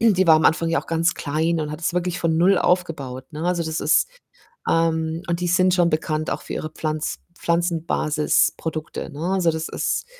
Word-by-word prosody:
die 195 Hz, -5 st, +4 dB
war 160 Hz, -, +8 dB
am 155 Hz, -, +1 dB
Anfang 165 Hz, +1 st, +2 dB
ja 165 Hz, -, +2 dB
auch -, -, -17 dB
ganz 165 Hz, +2 st, +1 dB
klein 160 Hz, +3 st, -1 dB
und 150 Hz, -1 st, -3 dB
hat 150 Hz, +2 st, -6 dB
das 170 Hz, -, 0 dB
wirklich 180 Hz, 0 st, -1 dB
von 165 Hz, -2 st, +1 dB
0 185 Hz, +4 st, +4 dB
aufgebaut, 140 Hz, -8 st, -1 dB
ne? 155 Hz, +2 st, -5 dB
Also 175 Hz, -1 st, +1 dB
das 160 Hz, 0 st, -3 dB
ist, 150 Hz, -, +3 dB, 0.6 s
ähm 165 Hz, 0 st, +1 dB
und 170 Hz, 0 st, -1 dB
die 175 Hz, -, -1 dB
sind 185 Hz, +1 st, +3 dB
schon 175 Hz, -2 st, +3 dB
bekannt 155 Hz, 0 st, -1 dB
auch -, -, -3 dB
für -, -, -6 dB
ihre 155 Hz, -, -4 dB
Pflanz 155 Hz, -1 st, -3 dB, 0.2 s
Pflanzenbasisprodukte, 160 Hz, -2 st, 0 dB
ne? 145 Hz, -, -8 dB
Also, 180 Hz, -3 st, +2 dB
das 160 Hz, 0 st, -3 dB
ist, -, -, -2 dB
165 Hz, 200 wpm, -22 LUFS, 155-175 Hz, 0.6 s, war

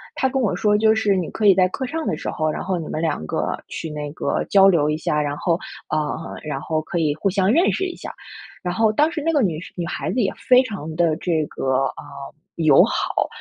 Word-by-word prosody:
她 265 Hz, -, +1 dB
跟 265 Hz, 0 st, -1 dB
我 205 Hz, -7 st, +1 dB
说， 210 Hz, +3 st, +2 dB
就 220 Hz, +1 st, +4 dB
是 210 Hz, -2 st, +2 dB
你 180 Hz, -4 st, -2 dB
可 215 Hz, -, -3 dB
以 200 Hz, -, +8 dB
在 185 Hz, 0 st, +3 dB
课 260 Hz, +8 st, -4 dB
上 320 Hz, +5 st, -4 dB
的 -, -, -1 dB
时 -, -, -7 dB
候， 155 Hz, 0 st, -1 dB
然 -, -, -4 dB
后 185 Hz, -2 st, -1 dB
你 160 Hz, -, -6 dB
们 -, -, -3 dB
2 155 Hz, -, -1 dB
个 -, -, -1 dB
去 -, -, -6 dB
那 150 Hz, -1 st, -5 dB
个 -, -, -1 dB
交 195 Hz, -1 st, +6 dB
流 160 Hz, -6 st, +3 dB
一 150 Hz, -, 0 dB
下， 150 Hz, -1 st, 0 dB
然 145 Hz, 0 st, -2 dB
后 170 Hz, +2 st, 0 dB, 0.3 s
啊， 155 Hz, -, +1 dB, 0.4 s
然 150 Hz, -3 st, -4 dB
后 155 Hz, +2 st, -2 dB
可 160 Hz, -, -5 dB
以 155 Hz, -3 st, +1 dB
互 160 Hz, +6 st, 0 dB
相 190 Hz, +1 st, +2 dB
认 335 Hz, +9 st, +4 dB
识 380 Hz, -, -1 dB
一 365 Hz, -, -5 dB
下。 -, -, -8 dB, 0.5 s
然 180 Hz, -1 st, -2 dB
后 220 Hz, +3 st, +3 dB
当 300 Hz, +9 st, +2 dB
时 320 Hz, -, -4 dB
那 330 Hz, -, +2 dB
个 295 Hz, -3 st, +2 dB
女 165 Hz, -6 st, 0 dB
生 -, -, -11 dB
女 175 Hz, -, -2 dB
孩 170 Hz, -, -3 dB
子 255 Hz, -, -1 dB
也 200 Hz, -, +1 dB
非 255 Hz, 0 st, +5 dB
常 190 Hz, -, -6 dB
地 165 Hz, -2 st, +2 dB
这 165 Hz, -3 st, 0 dB
个， 135 Hz, 0 st, 0 dB
啊， -, -, -10 dB, 0.5 s
友 155 Hz, -4 st, +6 dB
好， -, -, -1 dB
180 Hz, 270 characters per minute, -22 LUFS, 155-220 Hz, 0.5 s, 以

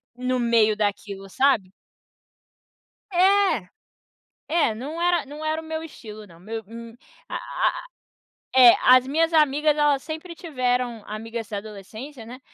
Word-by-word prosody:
no 250 Hz, +1 st, -1 dB
meio 230 Hz, -3 st, +3 dB
daquilo, 200 Hz, -1 st, -3 dB
sabe? 225 Hz, -5 st, +1 dB, 1.4 s
É! 375 Hz, -, +3 dB, 0.9 s
É, 305 Hz, -10 st, +2 dB
não 295 Hz, +9 st, -6 dB
era 350 Hz, -2 st, +2 dB
não 295 Hz, +3 st, -8 dB
era 315 Hz, +1 st, -1 dB
o -, -, -13 dB
meu 315 Hz, 0 st, -4 dB
estilo, 215 Hz, -9 st, -11 dB
não. 170 Hz, -2 st, -17 dB
Meu 220 Hz, +4 st, -6 dB
um 230 Hz, +1 st, -10 dB, 0.4 s
a -, -, -5 dB
a -, -, -9 dB, 1.0 s
é 245 Hz, -2 st, +9 dB
as 255 Hz, 0 st, +6 dB
minhas 325 Hz, +5 st, +1 dB
amigas 300 Hz, -1 st, +3 dB
elas 290 Hz, -2 st, +2 dB
sempre 320 Hz, +3 st, -7 dB
tiveram, 250 Hz, -, -2 dB
amigas 225 Hz, +1 st, -6 dB
da 205 Hz, -, -4 dB
adolescência, 220 Hz, +5 st, -9 dB
né, 245 Hz, +3 st, -10 dB
250 Hz, 140 wpm, -24 LUFS, 220-310 Hz, 1.4 s, é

